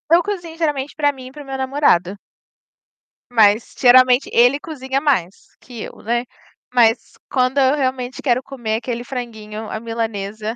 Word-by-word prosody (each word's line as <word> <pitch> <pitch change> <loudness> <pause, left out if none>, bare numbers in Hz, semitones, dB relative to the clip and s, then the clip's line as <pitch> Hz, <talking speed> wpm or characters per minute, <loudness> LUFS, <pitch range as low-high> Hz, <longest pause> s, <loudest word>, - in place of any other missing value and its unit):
Eu 350 - +4
cozinho, 345 -5 -5
geralmente, 295 -4 -2
para 290 -2 +2
mim 260 -1 -11
e - - -11
para 295 +1 -10
o - - -17
meu 270 0 -5
namorado. 260 - +1 1.1
Mas, 220 -1 +3
geralmente, 255 +1 +5
ele 245 +4 +4
cozinha 275 -4 -4
mais 200 - +1 0.2
que 240 -4 -10
eu, - - -10
né. 240 +2 -1 0.5
Mas, 230 -1 +2 0.2
quando 255 +1 +1
eu 265 +2 +4
realmente 260 -2 -2
quero 255 -2 +1
comer 235 -5 -4
aquele 240 0 -4
franguinho 220 -4 -7
à 215 - -4
milanesa, 220 -1 -4
250 Hz, 160 wpm, -19 LUFS, 225-275 Hz, 1.1 s, geralmente